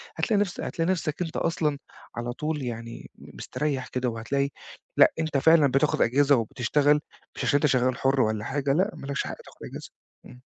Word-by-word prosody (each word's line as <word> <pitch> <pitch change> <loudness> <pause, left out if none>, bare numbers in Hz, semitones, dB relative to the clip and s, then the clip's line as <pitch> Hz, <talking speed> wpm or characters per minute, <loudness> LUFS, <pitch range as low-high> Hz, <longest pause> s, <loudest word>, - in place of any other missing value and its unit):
هتلاقي 215 -3 +1
نفس 190 -4 -2
هتلاقي 165 +2 -1
نفسك 165 -3 -2
أنت 170 -1 -3
أصلًا 155 -3 0 0.4
على 120 +1 -3
طول 150 +2 -3
يعني 115 -1 -6
م - - -14
مستريح 140 -4 -3
كده 125 -1 -1
وهتلاقي 135 +5 -1 0.5
لأ، - - +7
أنت 160 -3 0
فعلًا 155 +1 +5
بتاخد 135 +1 +1
أجازة 140 +4 +4
وبتشتغل، 135 +5 +2 0.4
مش - - -4
عشان - - +2
أنت 145 - +1
شغال 130 0 +2
حُر 135 0 +2
والّا 110 -2 0
حاجة 135 +1 0
لأ 185 +6 +2
ما - - -9
لكش 140 0 -1
حق - - -5
تاخد - - -17
أجازة - - -8 0.4
إمم. 125 0 -14
140 Hz, 190 wpm, -26 LUFS, 125-155 Hz, 0.5 s, لأ